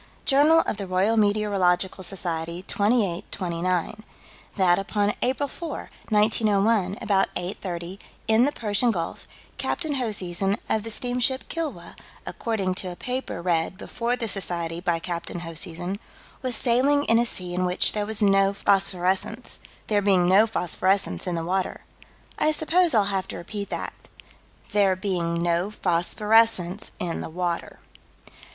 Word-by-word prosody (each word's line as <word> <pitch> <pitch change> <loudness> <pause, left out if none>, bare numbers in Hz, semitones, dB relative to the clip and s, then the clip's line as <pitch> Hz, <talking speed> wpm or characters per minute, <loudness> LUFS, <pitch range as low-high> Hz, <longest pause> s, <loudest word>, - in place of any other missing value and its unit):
Journal 300 +4 +5
of - - -3
the 200 -2 -5
Royal 190 +5 +2
Meteorological 200 -3 +1
Society, 170 -2 -3
28 205 -5 0
29: 180 +2 -2 0.5
That, 185 -2 +3
upon 205 +1 0
April 265 +3 0
4, 320 +2 -7 0.2
1901, 210 -2 +2
about 200 -3 +1
8:30, 180 0 -5 0.3
in 220 +2 +5
the 290 - +1
Persian 220 -1 0
Gulf, 175 -7 -3 0.3
Captain 315 -4 -1
Hoseason, 195 -5 +1
of 220 - +1
the 225 - -7
steamship 250 +3 -1
Kilwa, 325 -3 -5 0.3
according 205 -6 -2
to 185 - -5
a - - -8
paper 250 -4 -4
read 170 0 0
before 235 +3 -2
the 235 -2 -3
Society 170 -4 0
by 175 -2 +1
Captain 170 0 -4
Hoseason, 175 +3 -3 0.4
was 255 -3 0
sailing 270 +5 +3
in 230 -4 +4
a 240 - +2
sea 180 -5 -2
in 180 +1 0
which 180 0 +2
there 210 -1 -2
was 220 0 +2
no 195 0 +4
phosphorescence 195 +4 0 0.3
"there 205 -1 +1
being 190 -3 +3
no 200 +5 +5
phosphorescence 185 - 0
in 175 - -1
the 165 -1 -3
water." 185 +2 -2 0.6
I - - +3
suppose 325 0 +4
I'll 210 - +5
have 190 -1 -1
to - - -6
repeat 200 +3 -6
that: - - -4 0.4
"... - - -28
there 200 -2 +3
being 175 -3 -1
no 175 +3 +1
phosphorescence 210 +1 +1
in 170 -2 -2
the - - -6
water." 175 0 -3
195 Hz, 145 wpm, -25 LUFS, 180-225 Hz, 0.6 s, Journal